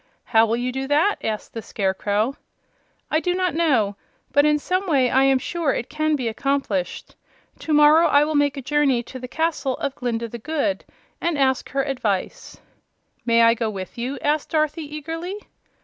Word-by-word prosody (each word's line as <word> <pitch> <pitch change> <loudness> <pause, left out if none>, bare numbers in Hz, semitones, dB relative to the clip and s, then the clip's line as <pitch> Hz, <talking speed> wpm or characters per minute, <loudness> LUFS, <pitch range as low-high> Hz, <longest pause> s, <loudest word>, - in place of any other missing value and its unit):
"How 225 0 +3
will 230 +2 0
you 250 +1 -2
do 265 +1 -4
that?" 310 +9 +2
asked 215 -1 -4
the 225 - -5
Scarecrow. 205 +5 -1 0.8
"I 310 - +3
do 355 +2 -1
not 365 -2 0
know; 250 -12 +1 0.3
but 285 +1 +4
in 300 0 +3
some 370 +6 -2
way 265 -6 +2
I 265 +1 +4
am 270 -1 +4
sure 315 +2 -1
it 235 - -5
can 310 0 +1
be 255 -5 -2
accomplished. 225 -6 -2 0.4
To 315 - -5
morrow 300 +2 +6
I 285 +1 +5
will 310 +1 -1
make 290 -1 +2
a 275 - -5
journey 275 -3 +2
to 255 +2 -9
the 250 - -7
castle 310 -3 -1
of 280 -1 -3
Glinda 235 -3 -3
the 235 +1 -8
Good, 300 +3 -2 0.4
and 335 -3 0
ask 265 -2 +1
her 275 0 0
advice." 225 -9 -3 0.7
"May 230 0 +5
I 230 0 +6
go 230 -1 -2
with 190 -3 -7
you?" 250 +4 -4
asked 295 0 0
Dorothy, 310 0 0
eagerly. 325 +6 -5
275 Hz, 185 wpm, -22 LUFS, 235-305 Hz, 0.8 s, morrow